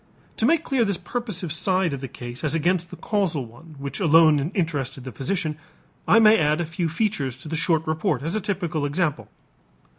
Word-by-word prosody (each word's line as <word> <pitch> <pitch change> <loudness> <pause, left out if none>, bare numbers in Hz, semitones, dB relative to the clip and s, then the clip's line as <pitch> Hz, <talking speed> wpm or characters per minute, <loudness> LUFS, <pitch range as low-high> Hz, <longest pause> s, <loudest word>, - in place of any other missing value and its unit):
To 225 - +3
make 330 +2 +3
clear 265 -6 +1
this 200 -4 0
purposive 185 -4 -4
side 185 -2 +1
of 135 - -5
the 135 - -4
case 120 0 -8
as 155 0 +1
against 175 +2 +1
the 180 - -9
causal 170 - -1
one 150 +8 -15
which 140 +5 -5
alone 160 -4 +5 0.2
interested 145 - -2
the 130 - -7
physician, 155 - -2 0.5
I - - +6
may 220 -1 +7
add 150 0 +2
a 170 - 0
few 165 +1 -2
features 160 - -1
to 140 - -11
the 160 - -3
short 160 0 +1
report 160 0 -1
as 165 +3 -2
a 215 - 0
typical 180 -6 -2
example. 155 0 -1
165 Hz, 200 wpm, -24 LUFS, 150-190 Hz, 0.5 s, may